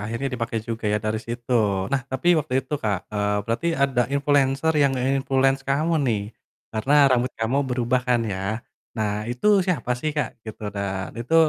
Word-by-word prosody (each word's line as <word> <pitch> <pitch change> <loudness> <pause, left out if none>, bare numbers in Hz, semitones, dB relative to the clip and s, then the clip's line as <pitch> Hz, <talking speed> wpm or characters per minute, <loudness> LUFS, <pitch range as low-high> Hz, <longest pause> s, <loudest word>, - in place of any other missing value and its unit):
Akhirnya 115 +6 -3
dipakai 115 -2 -2
juga 115 0 -4
ya - - +3
dari 110 +1 -2
situ. 120 +2 -5 0.4
Nah, 140 - +2
tapi 130 +7 0
waktu 135 -3 -1
itu, 140 - -12
Kak, 105 -4 0
eee, 105 0 0
berarti 115 +9 -2
ada 135 -3 +2
influenser 140 +1 +2
yang 140 -1 +4
nge-influence 135 +1 +1
kamu 155 +4 +1
nih, 105 -3 +1 0.5
karena 120 +7 +1 0.2
rambut 125 0 +1
kamu 115 +4 0
berubah 125 0 +1
kan 120 -1 +3
ya. 95 -3 -3 0.6
Nah 105 -2 0 0.2
itu 125 +11 -3 0.2
siapa 150 -9 -1
sih, 155 - 0
Kak? 125 -5 -2
Gitu 110 0 -9
dan 100 -1 -3
itu, 120 +7 -2
125 Hz, 170 wpm, -24 LUFS, 110-135 Hz, 0.6 s, yang